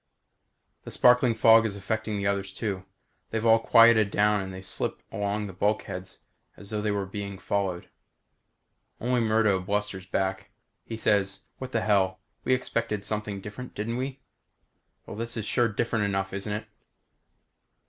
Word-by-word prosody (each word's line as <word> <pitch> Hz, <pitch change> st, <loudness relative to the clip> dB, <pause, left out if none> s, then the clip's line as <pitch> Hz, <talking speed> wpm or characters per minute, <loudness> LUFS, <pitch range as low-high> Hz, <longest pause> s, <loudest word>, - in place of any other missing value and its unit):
The -, -, -8 dB
sparkling 125 Hz, -1 st, +5 dB
fog 115 Hz, 0 st, +7 dB
is 110 Hz, -3 st, -2 dB
affecting 110 Hz, +2 st, -2 dB
the 100 Hz, -, -2 dB
others, 100 Hz, -1 st, 0 dB
too. 95 Hz, -2 st, -4 dB, 0.4 s
They've 110 Hz, 0 st, -2 dB
all 115 Hz, 0 st, +6 dB
quieted 115 Hz, -2 st, +6 dB
down 105 Hz, 0 st, +2 dB
and 95 Hz, 0 st, -6 dB
they 95 Hz, 0 st, -8 dB
slip 95 Hz, -, -2 dB
along 105 Hz, +1 st, -2 dB
the 95 Hz, -, -7 dB
bulkheads 95 Hz, -1 st, -2 dB, 0.4 s
as 100 Hz, +1 st, -11 dB
though 105 Hz, -1 st, -1 dB
they 105 Hz, -, 0 dB
were 100 Hz, -1 st, -1 dB
being 100 Hz, 0 st, -6 dB
followed. 95 Hz, -2 st, -2 dB, 1.1 s
Only 125 Hz, +1 st, +1 dB
Murdo 110 Hz, -3 st, +3 dB
blusters 95 Hz, -1 st, -2 dB
back. 95 Hz, 0 st, -2 dB, 0.4 s
He 115 Hz, -, -5 dB
says, 100 Hz, -3 st, +1 dB, 0.2 s
what 130 Hz, -1 st, -6 dB
the 115 Hz, -, 0 dB
hell? 95 Hz, -3 st, +2 dB, 0.2 s
We 130 Hz, -, +3 dB
expected 115 Hz, -5 st, -2 dB
something 105 Hz, -2 st, -3 dB
different, 105 Hz, +6 st, -8 dB
didn't 115 Hz, +3 st, -2 dB
we? 130 Hz, +1 st, -4 dB, 0.8 s
Well, -, -, -8 dB
this 115 Hz, +2 st, -5 dB
is 110 Hz, -, -3 dB
sure 120 Hz, +2 st, +2 dB
different 115 Hz, 0 st, 0 dB
enough, 95 Hz, -1 st, -1 dB
isn't 100 Hz, +2 st, -3 dB
it? 105 Hz, -, -4 dB
105 Hz, 160 wpm, -27 LUFS, 100-115 Hz, 1.1 s, fog